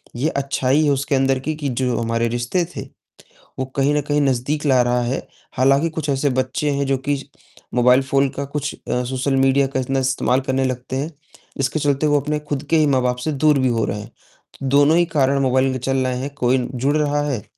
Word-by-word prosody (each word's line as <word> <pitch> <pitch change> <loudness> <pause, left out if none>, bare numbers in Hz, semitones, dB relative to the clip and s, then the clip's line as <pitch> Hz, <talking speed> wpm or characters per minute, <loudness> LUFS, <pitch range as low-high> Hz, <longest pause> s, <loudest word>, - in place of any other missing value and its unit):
ये 140 +6 0
अच्छाई 140 0 +1
है 145 - +3
उसके 140 +1 0
अंदर 135 0 +2
की 155 +4 -3
कि 145 -2 -3
जो 125 -1 -1
हमारे 115 0 0
रिश्ते 120 +9 -1
थे, - - -3 0.8
वो 130 - -1
कहीं 140 +1 +2
न 150 - +2
कहीं 145 +1 0
नज़दीक 140 +3 0
ला 130 -3 +4
रहा 120 0 +1
है। 125 +3 -3 0.3
हालाँकि 135 +5 +3
कुछ 155 -2 -5
ऐसे 140 +1 +1
बच्चे 130 +3 -1
हैं 140 -1 -1
जो 135 0 +1
कि 145 - +2 0.6
मोबाइल 125 +2 +5
फ़ोन 135 +1 +1
का 140 0 -5
कुछ 145 +1 -4
अ, 125 - -3
सोशल 130 +2 -1
मीडिया 135 +1 +3
का 130 0 -2
इतना 135 +1 -1
इस्तेमाल 130 0 +1
करने 135 0 +1
लगते 130 0 -3
हैं। 145 +4 -2 0.5
इसके 135 +3 0
चलते 145 +1 +1
वो 145 -1 +3
अपने 150 +2 -2
खुद 145 -1 -4
के 165 - +4
ही 155 - +4
माँ-बाप 125 -3 +1
से 155 - 0
दूर 150 0 +3
भी 130 - +2
हो 115 -2 0
रहे 105 - -3
हैं। 110 +3 -11 0.6
दोनों 145 +4 +5
ही 175 - +4
कारण 140 0 +3
मोबाइल 130 0 +2
के 130 - -3
चल 135 +2 -1
रहे 125 - -1
हैं 140 +2 -4
कोई 125 +1 +2 0.2
जुड़ 140 +5 0
रहा 145 -1 +1
है, 125 -7 -2
135 Hz, 220 wpm, -20 LUFS, 130-145 Hz, 0.8 s, मोबाइल